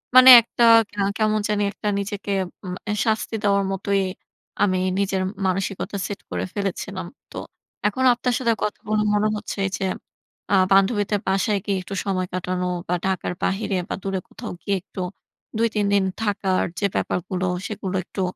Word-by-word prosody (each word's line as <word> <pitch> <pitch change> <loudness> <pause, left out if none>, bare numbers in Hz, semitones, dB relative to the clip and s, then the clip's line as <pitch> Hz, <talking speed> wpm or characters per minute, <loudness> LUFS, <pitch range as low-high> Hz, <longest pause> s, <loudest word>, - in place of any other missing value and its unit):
মানে 255 0 +10
একটা 235 +1 -1 0.3
কা 205 0 -3 0.2
কেমন 215 -1 +2
জানি 210 -1 +1
একটা 210 - -6
নিজেকে 200 0 -4 0.3
উম 180 0 -4 0.2
এ - - +1
শাস্তি 220 0 0
দেওয়ার 200 -1 +3
মতোই 195 +1 0 0.6
আমি 185 -2 +2 0.2
নিজের 195 -1 0 0.2
মানসিকতা 195 +2 -2
set 205 - -5
করে - - -2
ফেলেছিলাম। 195 -2 -3 0.2
তো - - -8 0.5
এখন 255 +5 -1
আপনার 245 +1 -1
সাথে 235 -3 +2
কথা 210 - -2
বলে 215 0 +2
মনে 210 +1 +2
হচ্ছে 210 - -5 0.2
যে - - -4 0.7
আ - - +7 0.2
বান্ধবীদের 205 +1 +3
বাসায় 195 +2 +1
গিয়ে 200 -1 0
একটু 195 +2 -7
সময় 185 -2 -1
কাটানো 180 0 -2 0.2
বা 180 - +1
ঢাকার 190 -1 -1
বাহিরে 195 0 0
বা - - -1
দূরে 195 -1 -1
কোথাও - - -7
গিয়ে 200 - 0
একটু 185 - -8 0.6
২ 230 +1 +3
৩ 205 -1 +2
দিন 200 -1 +4 0.2
থাকার 200 -3 +1 0.2
যে 200 - +1
ব্যাপারগুলো 185 +1 -1 0.2
সেগুলো 195 -3 -4
একটু 195 - -5
200 Hz, 165 wpm, -23 LUFS, 190-210 Hz, 0.7 s, মানে